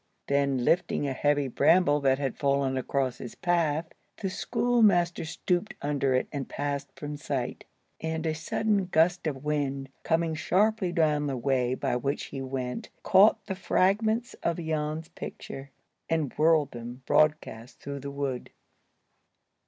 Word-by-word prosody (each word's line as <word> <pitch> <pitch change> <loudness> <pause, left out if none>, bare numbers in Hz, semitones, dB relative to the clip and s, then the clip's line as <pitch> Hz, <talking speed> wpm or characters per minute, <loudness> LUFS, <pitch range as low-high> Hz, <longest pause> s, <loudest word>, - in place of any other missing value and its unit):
Then, 140 -3 +1
lifting 170 -4 +2
a 135 - -1
heavy 145 +1 +1
bramble 155 +2 +4
that 135 -2 +3
had 135 -1 -2
fallen 140 -1 +1
across 130 -1 -1
his 120 - -8
path, 170 -3 +1 0.3
the 195 -3 -3
schoolmaster 200 -8 +2
stooped 175 +4 -1
under 140 -2 0
it, 130 - +1
and 140 -3 -4
passed 140 -1 -3
from 145 0 -6
sight. 140 -4 -3 0.3
And 160 0 -3
a 160 - +1
sudden 195 +5 0
gust 175 0 +2
of 135 -3 -4
wind 140 -3 -1
coming 165 0 +1
sharply 190 +4 +1
down 150 -4 +2
the 135 -2 -2
way 130 -1 +1
by 125 - -1
which 140 +3 -2
he 135 - -4
went 130 -2 -4
caught 200 +2 +5
the 195 - -3
fragments 215 +6 +1
of 170 - 0
Jan's 160 -1 -2
picture, 135 +1 -8 0.4
and 160 -4 0
whirled 155 -2 +3
them 120 +2 -8
broadcast 135 -6 +1
through 140 0 -6
the 140 +1 -6
wood. 140 -3 -3
150 Hz, 145 wpm, -28 LUFS, 135-170 Hz, 0.4 s, caught